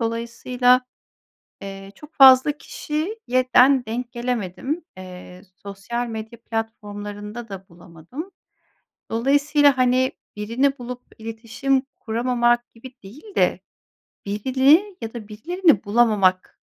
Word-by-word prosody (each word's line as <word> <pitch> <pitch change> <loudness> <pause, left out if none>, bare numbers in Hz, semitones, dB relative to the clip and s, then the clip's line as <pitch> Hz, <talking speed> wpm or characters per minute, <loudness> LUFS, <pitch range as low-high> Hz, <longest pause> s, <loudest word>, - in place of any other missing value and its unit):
Dolayısıyla, 235 +2 +1 0.8
eee, 195 0 -9
çok 300 +1 -15
fazla 265 +1 +8
kişiye 305 - -3
den 260 0 +6
denk 240 +2 -4
gelemedim. 245 - -3
Eee, 180 -1 -11 0.2
sosyal 200 +5 -4
medya 225 +1 -8
platformlarında 210 0 -6
da 195 -1 -9
bulamadım. 175 - -10 0.8
Dolayısıyla, 285 +3 +3
hani, 255 +1 +2 0.2
birini 250 +7 0
bulup 245 0 -7 0.2
iletişim 230 +4 -2 0.2
kuramamak 240 +1 0
gibi 250 +3 -12
değil 290 - -13
de - - +2 0.7
birini 265 - +3
ya 225 -1 -6
da 225 -4 -8
birilerini 315 - +1
bulamamak, 205 -4 +2
240 Hz, 100 wpm, -22 LUFS, 210-265 Hz, 0.8 s, fazla